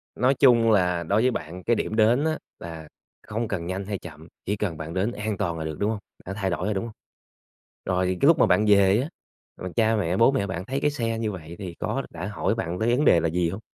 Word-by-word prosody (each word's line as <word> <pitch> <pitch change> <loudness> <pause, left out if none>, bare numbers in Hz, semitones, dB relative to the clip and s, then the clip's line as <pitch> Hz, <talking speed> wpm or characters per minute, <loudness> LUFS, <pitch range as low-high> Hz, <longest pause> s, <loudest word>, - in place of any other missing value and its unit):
Nói 130 +2 +3
chung 115 -4 +6
là 90 -4 +2
đối 100 +7 +2
với 130 +1 +3
bạn, 85 +1 -6
cái 120 - +2
điểm 110 - -2
đến 115 +6 +4
á 160 -1 0 0.2
là 80 -2 -8 0.4
không 115 +2 -2
cần 95 -5 -3
nhanh 95 +2 -3
hay 100 -1 -3
chậm, 80 -2 -11 0.2
chỉ 105 - 0
cần 95 -6 -3
bạn 80 +1 -6
đến 95 +5 0
an 105 -2 -3
toàn 85 -5 -2
là 80 - -4
được, 80 -1 -5
đúng 105 +1 +1
hông? 105 - -3 0.3
Đã 95 - -5
thay 95 -2 -2
đổi 90 0 -2
rồi, 105 - 0
đúng 95 - -2
hông? 115 -1 -7 0.9
Rồi 90 0 0
cái - - +4
lúc 165 +1 +6
mà - - +5
bạn 105 +1 +3
về 100 +1 +5
á, 145 - -4 0.5
rồi 90 -1 -6
cha 115 -1 +3
mẹ, 90 -3 0
bố 115 +5 +5
mẹ 130 -7 0
bạn 90 -2 -4
thấy 135 +6 -3
cái 150 - +2
xe 115 -5 -2
như 110 -2 -2
vậy 85 -2 -9
thì 90 -4 -6
có - - -2
đã 85 +2 -6
hỏi 105 0 -1
bạn 90 -6 -3
tới 120 +2 +2
vấn 145 - +1
đề 85 - +6
là 85 - 0
gì 85 +1 0
hông? 95 +5 -6
100 Hz, 265 wpm, -25 LUFS, 90-115 Hz, 0.9 s, chung